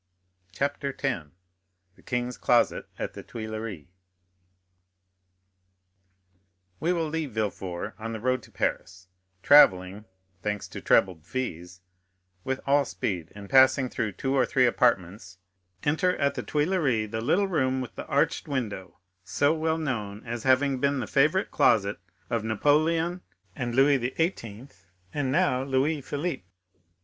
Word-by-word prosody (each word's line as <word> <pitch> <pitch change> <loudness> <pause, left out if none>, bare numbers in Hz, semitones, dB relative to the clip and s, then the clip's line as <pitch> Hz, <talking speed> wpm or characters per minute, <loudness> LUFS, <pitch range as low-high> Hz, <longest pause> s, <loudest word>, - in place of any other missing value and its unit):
Chapter 140 +5 -2
10. 120 - -3 0.6
The - - -21
King's 125 0 -3
Closet - - +2
at - - -4
the - - -8
Tuileries 110 -7 -6 2.9
We 170 - +1
will 165 -3 0
leave 155 -5 -3
Villefort 100 -2 -3
on 115 +1 -5
the 110 - -5
road 130 +3 0
to - - -17
Paris, 95 0 -3 0.3
travelling—thanks 95 -4 +3
to - - -8
trebled 90 -5 +2
fees—with 90 0 -7
all 140 +1 +4
speed, 90 - -4
and 100 -1 -9
passing 130 +1 +5
through 110 -4 -3
two 135 +8 -2
or 130 - +4
three 130 0 +3
apartments, 95 -6 0 0.5
enter 180 +5 +1
at 140 0 +1
the - - -4
Tuileries 145 - 0
the 110 -1 -3
little 185 - +2
room 130 -7 0
with 125 - -7
the - - -8
arched - - 0
window, 105 - -4 0.3
so 145 +9 +1
well 160 0 0
known 110 -9 -4
as 120 0 -4
having 130 +1 +2
been 140 +1 +1
the - - -2
favorite 155 +8 +2
closet 100 -2 +3 0.3
of 115 -2 -1
Napoleon 155 - +1 0.3
and 120 -1 -3
Louis 140 +1 +5
XVIII., 125 - -3 0.4
and 140 -3 -1
now 145 -5 +2
of 135 - -5
Louis 140 +3 +1
Philippe. 145 - -4
125 Hz, 135 wpm, -27 LUFS, 100-145 Hz, 2.9 s, passing